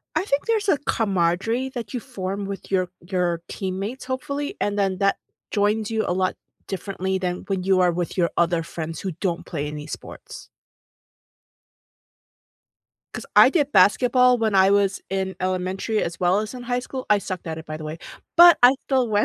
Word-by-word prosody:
I - - +1
think 280 -6 0
there's 435 -3 0
a 310 - +5
camaraderie 225 +3 0
that 235 -2 -6
you 245 - -2
form 200 -5 -5
with 195 0 -7
your 185 -2 +1
your 175 -2 -1
teammates, 195 +7 -4
hopefully, 280 +3 -4
and 205 0 -1
then 195 -2 0
that 195 0 +2 0.3
joins 210 +1 +1
you 220 -1 0
a - - 0
lot 185 0 0 0.3
differently 190 -1 -3
than 180 -1 -3
when 190 -2 -2
you 190 -1 +3
are 180 -1 +4
with 175 +2 -3
your 170 -1 +2
other 170 -1 +2
friends 160 -1 -6
who 190 -3 -3
don't 175 0 -3
play 150 -3 -3
any 150 0 -7
sports. - - -9 2.7
'Cause - - -6
I - - +9
did 290 -5 +1
basketball 250 +3 +5
when 220 -2 0
I 190 0 +5
was 200 -1 +2
in 190 0 -2
elementary 185 +4 -1
as 170 - -4
well 180 +2 +2
as 215 +3 -5
in 250 - -7
high 245 0 -1
school- 255 +1 -6
I 210 - +6
sucked 185 -3 -6
at 160 -1 -4
it, 160 - -10
by 155 - -5
the 155 - -8
way- 155 +2 -6 0.4
but 345 0 +9
I 245 - +9
still 260 -3 +1
went, 210 0 +2
195 Hz, 185 wpm, -23 LUFS, 180-235 Hz, 2.7 s, I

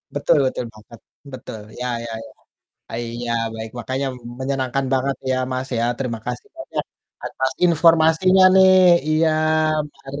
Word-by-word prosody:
Betul 145 - +2
betul 130 -1 -2
banget, 110 +1 -15 0.3
betul, 120 -4 -8 0.2
ya 125 - -3 0.2
ya 115 - -7
ya, - - -13 0.6
eee, 120 +1 -4
iya, 120 0 -3 0.2
baik 110 0 -6
makanya 130 +3 -3 0.3
menyenangkan 135 0 -2
banget 135 +1 0
ya, 130 - +1 0.2
Mas, 130 +1 -3
ya 115 - +1
terima 125 -4 -3
kasih 125 -1 -5
banyak - - -4 0.4
atas 130 0 -2
informasinya 165 +2 +4
nih, 190 0 +7 0.4
iya 160 +1 +3 0.6
mari. 140 +1 -9
130 Hz, 140 wpm, -21 LUFS, 120-155 Hz, 0.6 s, nih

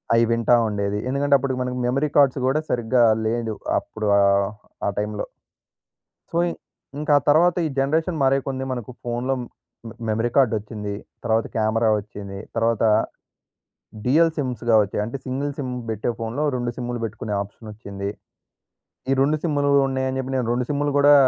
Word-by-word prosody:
అయి 115 0 +5
వింటా 115 +1 +4
ఉండేది. 100 -1 -1
ఎందుకంటే 140 +1 +3
అప్పటికి 130 -2 -2
మనకు 125 0 -3
మెమరీ 140 +4 +1
కార్డ్స్ 140 -2 +5
గూడా 140 +4 +2
సరిగ్గా 120 +1 +2 0.2
లేదు. 115 -1 -1 0.2
అప్పుడు 110 -1 -4
ఆహ్, 100 0 +4 0.4
ఆ - - +3
టైంలో. 105 0 -2 1.1
సో 170 - -1
ఇ - - -2 0.5
ఇంకా 150 0 -1
ఆ - - -12
తర్వాత 170 +4 +5
ఈ - - +1
జనరేషన్ 160 +5 +1
మారే 135 +1 +4
కొన్ని 130 -1 -2
మనకు 125 -1 -5
ఫోనులో 120 +2 -1
హ్మ్, 120 - -6 0.4
మె 115 - -10 0.2
మెమరీ 115 +2 +1
కార్డ్ 130 -5 +4
ఒచ్చింది, 105 -1 -5 0.3
తరువాత 110 0 +1
కెమెరా 110 +1 +2
ఒచ్చింది, 100 -1 -8 0.2
తరువాత 115 0 +1 1.2
డ్యుయల్ 160 +5 +4
సిమ్స్‌గా 120 -4 0
ఒచ్చాయి. 100 +1 -3
అంటే 120 +5 -5
సింగిల్ 135 +2 -2
సిమ్ 130 -3 -3 0.2
బెట్టే 110 +1 -2
ఫోన్‌లో 115 +6 -2
2 120 -1 -1
సిమ్ములు 120 -1 -3
బెట్టుకునే 110 -1 -4
ఆప్‌షనొచ్చింది. 100 -1 -7 1.0
ఈ - - +4
2 150 +3 +3
సిమ్ములు 145 -3 +1 0.2
ఉన్నాయని 130 0 -1
చెప్పి 130 0 -3
నేను 125 - 0
2 125 +1 0
సిమ్ములు 145 0 0
గూడా 145 +1 +7
120 Hz, 160 wpm, -23 LUFS, 110-135 Hz, 1.2 s, గూడా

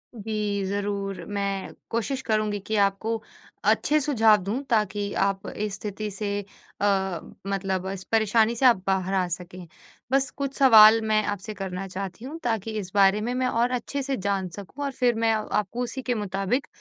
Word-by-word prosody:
जी, 210 -2 -2
ज़रूर 200 0 -3
मैं 200 -1 -2 0.2
कोशिश 260 +4 -2
करूँगी 215 -2 +1
कि 215 +3 -3
आपको 215 +3 -1 0.4
अच्छे 305 +1 +3
सुझाव 225 -7 +4
दूँ 220 +7 -2
ताकि 210 -3 0
आप 195 -1 -1
इस 210 -1 -4
स्थिति 210 +1 -5
से 205 +1 -2 0.4
अ, 190 -3 +1 0.3
मतलब 190 -1 -1
इस 190 -1 -5
परेशानी 225 +1 +3
से 260 +3 +1
आप 235 -7 +6
बाहर 190 0 0
आ 185 -2 +2
सकें। 180 0 -6 0.4
बस 270 0 +2
कुछ 275 -1 -2
सवाल 225 -4 +8
मैं 215 0 +3
आपसे 205 +1 -4
करना 195 -1 -5
चाहती 195 +4 -6
हूँ 310 +5 -7
ताकि 225 -2 -1
इस 185 -2 -7
बारे 200 +1 +5
में 240 +3 -2
मैं 255 0 0
और 240 +1 +1
अच्छे 255 +3 -2
से 270 -1 -2
जान 195 -1 -1
सकूँ 230 +8 -7
और 275 - -2
फिर 245 -3 +1
मैं 225 0 +2
आपको 215 +1 -1
उसी 260 +2 -5
के 250 -1 -1
मुताबिक, 200 +5 -1
210 Hz, 175 wpm, -25 LUFS, 195-230 Hz, 0.4 s, सवाल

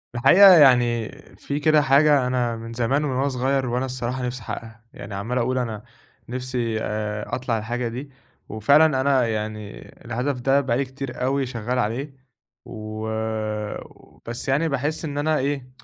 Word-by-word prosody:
الحقيقة 185 +11 +8
يعني 120 -7 +5 0.3
في 145 +1 -4
كده 155 0 +4
حاجة 140 -1 +4
أنا 125 -2 0
من 115 0 -8
زمان 120 +5 0
من 150 - -1
وأنا 130 +2 0
صغير 135 +1 0
وأنا 125 +2 -1
الصراحة 125 0 -3
نفسي 125 0 -4
أحقّقها. 115 +1 -8
يعني 100 - -9
عمّال 110 +6 -3
أقول 130 +1 0
أنا 110 -4 -3 0.5
نفسي 125 -2 -2
آآ 105 0 -3
أطلع 125 -3 -2
الحاجة 120 +3 -3
دي. 125 +5 -6 0.4
وفعلًا 140 +6 +4
أنا 130 -3 +2
يعني 105 -1 -4 0.3
الهدف 125 +3 -2
ده 135 +2 +3
بقى 125 -4 0
لي 140 - 0
كتير 130 -1 -7
أوي 135 +1 +1
شغّال 125 0 -3
عليه. 125 +5 -2 0.5
و 110 -1 -6 1.2
بس 120 +1 -6
يعني 150 +5 +2
باحس 150 +4 -2
إن 145 -2 -5
أنا 155 +1 +1
إيه، 135 -1 -2
125 Hz, 160 wpm, -23 LUFS, 115-140 Hz, 1.2 s, الحقيقة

